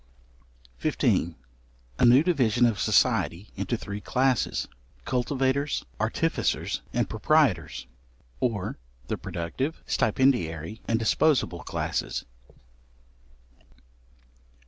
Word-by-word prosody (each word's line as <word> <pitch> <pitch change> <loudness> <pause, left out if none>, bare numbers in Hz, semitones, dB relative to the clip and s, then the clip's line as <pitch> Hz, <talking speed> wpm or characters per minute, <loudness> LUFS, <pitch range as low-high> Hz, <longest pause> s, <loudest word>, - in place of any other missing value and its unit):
§15. 85 -1 +1 0.6
A - - +5
new 125 +5 +7
division 125 - +3
of 115 -4 +1
society 90 +5 +2
into 100 +4 -2
three 100 -1 -6
classes. 130 +1 +1 0.4
Cultivators, 130 +3 0
Artificers, - - 0
and 120 -3 0
Proprietors, 110 - +1 0.5
or 105 - -2 0.3
the - - -1
productive, 130 - -4
stipendiary, 105 - +1
and 115 - +2
disposible 130 +6 +2
classes. - - -3
120 Hz, 80 wpm, -27 LUFS, 100-135 Hz, 0.6 s, new